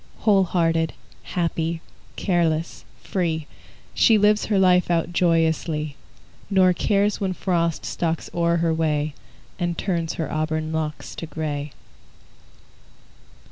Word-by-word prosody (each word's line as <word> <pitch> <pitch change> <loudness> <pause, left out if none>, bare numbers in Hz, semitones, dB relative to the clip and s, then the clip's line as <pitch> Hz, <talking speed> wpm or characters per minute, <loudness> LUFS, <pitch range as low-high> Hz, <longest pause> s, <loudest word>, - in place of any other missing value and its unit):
Whole 200 -3 +4
hearted, 165 -2 +1 0.3
happy, 165 -1 -2 0.4
careless, 170 -3 0 0.2
free, 165 -4 -1 0.5
She 225 -3 +5
lives 210 +1 +3
her 210 - +1
life 180 -2 +4
out 170 0 0
joyously, 160 -3 +1 0.5
Nor 185 -2 +5
cares 205 +3 +1
when 190 -2 0
Frost 170 -3 -1
stalks 165 -1 -2
o'er 170 0 +2
her 165 -1 +1
way 155 -2 0 0.5
And 175 -2 -1
turns 170 -4 -1
her 160 -4 -4
auburn 155 0 -1
locks 155 -1 -3
to 165 - -6
gray. 145 -2 -4
165 Hz, 115 wpm, -23 LUFS, 160-180 Hz, 0.5 s, She